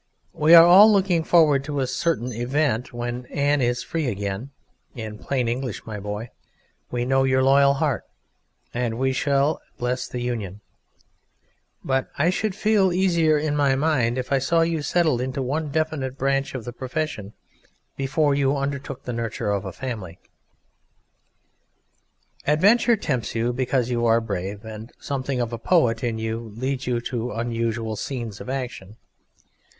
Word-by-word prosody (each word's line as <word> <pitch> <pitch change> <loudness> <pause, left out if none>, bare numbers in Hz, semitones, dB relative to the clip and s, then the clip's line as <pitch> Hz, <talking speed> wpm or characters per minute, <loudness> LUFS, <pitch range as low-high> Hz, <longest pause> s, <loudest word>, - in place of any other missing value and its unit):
We 155 +3 +6
are 165 0 +10
all 195 +5 +8
looking 190 -5 +2
forward 155 -5 +4
to 145 -1 -3
a 130 - +1
certain 125 -3 -1
event 125 +1 -1
when 120 0 -5
Anne 145 0 +1
is 120 0 0
free 160 -4 -2
again; 100 +2 -3 0.5
in 110 -3 -7
plain 130 -4 -1
English, 125 -1 -3
my 110 -2 -6
boy, 105 +3 -5 0.6
we 120 0 -2
know 135 +1 +2
your 130 0 +2
loyal 140 +1 +5
heart, 145 -3 -1 0.7
and 120 -2 -2
we 130 +1 +1
shall 140 +3 +1 0.2
bless 125 +1 -2
the 125 - -5
union; 110 -5 -4 1.2
but 130 0 0
I 170 +5 +3
should 200 +1 -2
feel 210 -3 +3
easier 170 -4 +3
in 150 0 -1
my 140 -2 +3
mind 135 -5 +1
if 130 +1 -4
I 135 - +3
saw 165 +5 +2
you 165 -1 0
settled 155 -5 +1
into 130 +2 -3
one 150 +4 -2
definite 140 -3 -2
branch 135 +1 0
of 125 - -5
the 120 - -6
profession 130 -6 -4 0.6
before 145 +2 +1
you 140 0 +1
undertook 140 -1 -4
the 125 - -4
nurture 115 -3 -2
of 100 0 -1
a 95 - -4
family. 105 -8 -6 2.3
Adventure 205 - +4
tempts 130 - -2
you 115 +2 0
because 125 -1 0
you 120 -1 +1
are 115 0 +4
brave, 100 -1 -5
and 110 +1 -8
something 135 -2 -3
of 120 -1 -2
a 115 - -4
poet 120 -6 +2
in 115 -2 -1
you 110 0 -3 0.2
leads 130 +2 -3
you 120 -2 0
to 120 0 -3
unusual 115 -1 -2
scenes 115 -2 -5
of - - -8
action. 125 -7 -5
130 Hz, 160 wpm, -23 LUFS, 115-145 Hz, 2.3 s, are